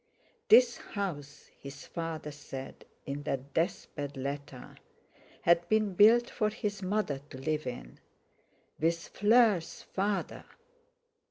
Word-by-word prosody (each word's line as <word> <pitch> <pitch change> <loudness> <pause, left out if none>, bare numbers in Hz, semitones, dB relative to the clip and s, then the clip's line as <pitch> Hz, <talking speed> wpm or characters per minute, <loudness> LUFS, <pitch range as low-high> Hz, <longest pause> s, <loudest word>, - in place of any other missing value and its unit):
This 245 -1 +7
house 150 -9 -6
his 140 0 -10
father 165 -3 -5
said 135 -2 -9 0.2
in 140 +1 -4
that 135 0 -4
death 165 +2 0
bed 145 -1 -5
letter—had 140 +5 -3
been 215 -2 +2
built 230 +5 +6
for 215 - 0
his 205 -1 -4
mother 185 -7 -1
to - - -9
live 155 +1 -2
in—with 160 - -6
Fleur's 210 -5 +3
father! 200 +1 -2
165 Hz, 105 wpm, -30 LUFS, 140-205 Hz, 0.2 s, This